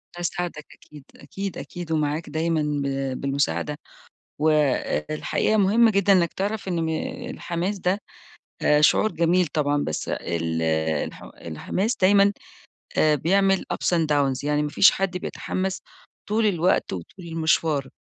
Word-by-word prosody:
أساعدك 175 -3 -4
أكيد 150 -2 -15
أكيد 195 +7 -6
أكيد 175 -2 -7
ومعاك 155 0 -1
دايمًا 160 +1 0 0.2
ب 135 -1 -2
بالمساعدة، 140 +1 -1 0.6
والحقيقة 155 +5 +1
مهم 215 +3 +4
جدًا 200 -2 +3
إنك 175 -3 +3
تعرف 200 +1 -3
إن 170 -2 -1
م - - -1 0.4
الحماس 180 -1 -3
ده 185 +2 0 0.8
شعور 215 +7 +4
جميل 175 +2 +2
طبعًا 145 -1 0
بس 80 - -3
ال 80 -1 -2 0.4
الح - - -11
الحماس 190 - -3
دايمًا 200 +1 +4 0.6
آآ 155 -1 +4
بيعمل 195 +6 +2
ups - - -4
and 165 - +1
downs، 140 -3 +1
يعني 150 0 +1
ما 150 - -1
فيش 195 - +6
حد 190 -1 -2
بيتحمّس 190 +1 -3 0.5
طول 215 +1 +2
الوقت 180 -2 +1
وطول 95 - -8
المشوار، 160 -4 0
165 Hz, 130 wpm, -24 LUFS, 150-190 Hz, 0.8 s, فيش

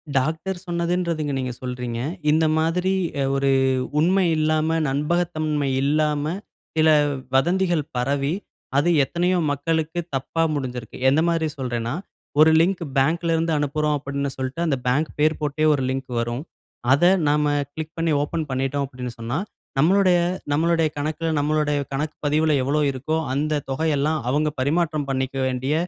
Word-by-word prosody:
Doctor 160 +8 0
சொன்னதுன்றதுங்க, 170 -3 -1
நீங்க 130 -2 -3
சொல்றீங்க. 125 -2 -4 0.3
இந்த 160 +1 +3
மாதிரி, 175 +4 +1 0.3
அ - - +2
ஒரு 135 0 +1 0.5
உண்மை 185 +4 +3
இல்லாம, 155 0 +1 0.2
நண்பகத்தன்மை 155 0 0
இல்லாம, 150 0 +1 0.5
சில 160 0 +5 0.5
வதந்திகள் 175 +2 +2
பரவி, 140 +4 0 0.4
அது 150 +5 +3
எத்தனையோ 175 +5 0
மக்களுக்கு 160 +3 -1 0.2
தப்பா 135 +5 -2
முடிஞ்சுருக்கு. 125 -5 -5
எந்தமாரி 160 +2 +2
சொல்றேன்னா, 120 -2 -2 0.5
ஒரு 155 +1 +7
லிங்க் 180 0 +1
பேங்க்ல 165 +5 +2
இருந்து 165 0 0
அனுப்புறோம் 150 +1 0
அப்பிடின்னு 140 0 -3
சொல்லிட்டு, 130 +6 -3
அந்த 140 - +1
பேங்க் 145 +5 +1
பேர் 155 +1 +3
போட்டே 150 +1 0
ஒரு 135 - 0
லிங்க் 130 -1 -4
வரும். 120 +4 -2 0.5
அத 150 +5 +2 0.2
நாம, 150 0 +2 0.3
கிளிக் 160 0 -6
பண்ணி 165 -1 +1
ஓப்பன் 155 +1 -2
பண்ணிட்டோம் 135 +2 -1
அப்பிடினு 125 -2 -7
சொன்னா, 120 +5 -2 0.4
நம்மளுடைய, 185 +2 +4 0.3
நம்மளுடைய 165 +1 +2
கணக்கில, 155 +2 -2
நம்மளுடைய 150 0 +1
கணக்கு 150 +3 -2
பதிவுல 155 +1 +2
எவ்ளோ 145 +3 +1
இருக்கோ, 140 +5 -2 0.2
அந்த 150 +1 0
தொகை 160 +4 0
எல்லாம், 155 +2 +1
அவுங்க 150 +3 +1
பரிமாற்றம் 155 0 0
பண்ணிக்க 130 0 -2
வேண்டிய, 130 +3 -1
150 Hz, 135 wpm, -23 LUFS, 135-160 Hz, 0.5 s, ஒரு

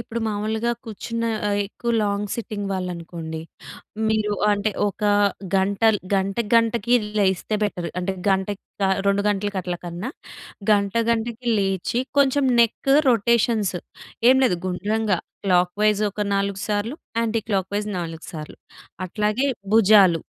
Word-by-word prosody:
ఇప్పుడు 235 0 -5
మామూలుగా 220 +2 -1
కూర్చున్న 230 +1 -4 0.2
ఆహ్, 205 0 +1
ఎక్కువ 235 +3 -4
లాంగ్ 205 0 -1
సిట్టింగ్ 210 -3 -4
వాళ్ళు 185 -1 -2
అనుకోండి. 165 -1 -7 0.7
మీరు 215 -1 +1 0.2
అంటే 205 +1 0 0.2
ఒక 205 +2 -5 0.5
గంటల్ 200 +3 +3 0.2
గంట, 195 0 0 0.2
గంటకి 230 0 +3 0.2
లేస్తే 190 +1 +1
బెటర్. 180 -4 -2
అంటే 180 +2 -1 0.2
గంటకి 195 +1 0 0.2
ఆహ్, 190 0 +2
రెండు 200 0 +2
గంటలకి 205 -1 -1
అట్ల 180 0 -3
కన్నా, 175 +8 -5 0.6
గంట, 200 -2 +2 0.2
గంటకి 235 +1 -2
లేచి 195 +4 0 0.2
కొంచెం 280 0 +3 0.2
నెక్ 235 +4 +1 0.2
రొటేషన్స్ 225 -3 +2 0.5
ఏం 260 - +6
లేదు 180 -9 +2
గుండ్రంగా 205 +2 0 0.3
క్లాక్‌వై‌జ్ 200 +3 +2
ఒక 205 - -7
4 200 0 -1
సార్లు 210 +5 -1 0.3
యాంటీ 225 -1 0
క్లాక్‌వై‌జ్ 200 +1 -1
4 165 -1 -6
సార్లు. 155 -2 -8 0.5
అట్లాగే 210 +7 0 0.3
భుజాలు 200 -6 +6
205 Hz, 125 wpm, -23 LUFS, 190-220 Hz, 0.7 s, ఏం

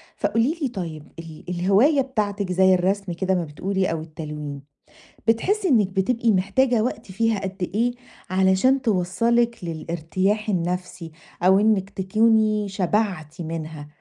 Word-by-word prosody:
فقولي 245 +9 0
لي 280 - +1
طيّب، 170 - -6
ال 165 -2 -10
الهواية 200 - +3
بتاعتِك 205 -7 -2
زي 190 +1 +4
الرسم 190 +1 0
كده 190 +2 -1
ما 180 - 0
بتقولي 185 +5 -2
أو 165 -1 -3
التلوين، 150 -2 -7 0.7
بتحسي 380 - +2
إنِك 220 -8 +4
بتبقي 225 +5 +1
محتاجة 215 +5 +2
وقت 225 -4 -4
فيها 225 +2 0
قد 190 -2 -4
إيه 235 +3 +2 0.4
علشان 190 +8 +3
توصّلِك 230 +3 +1
للارتياح 175 +6 -2
النفسي 180 -2 -3 0.3
أو 190 +2 +6
إنِك 205 -2 +2
تكوني 215 +1 +2
شبعتِ 185 -4 -1
منها؟ 160 -2 -6
190 Hz, 130 wpm, -23 LUFS, 175-225 Hz, 0.7 s, أو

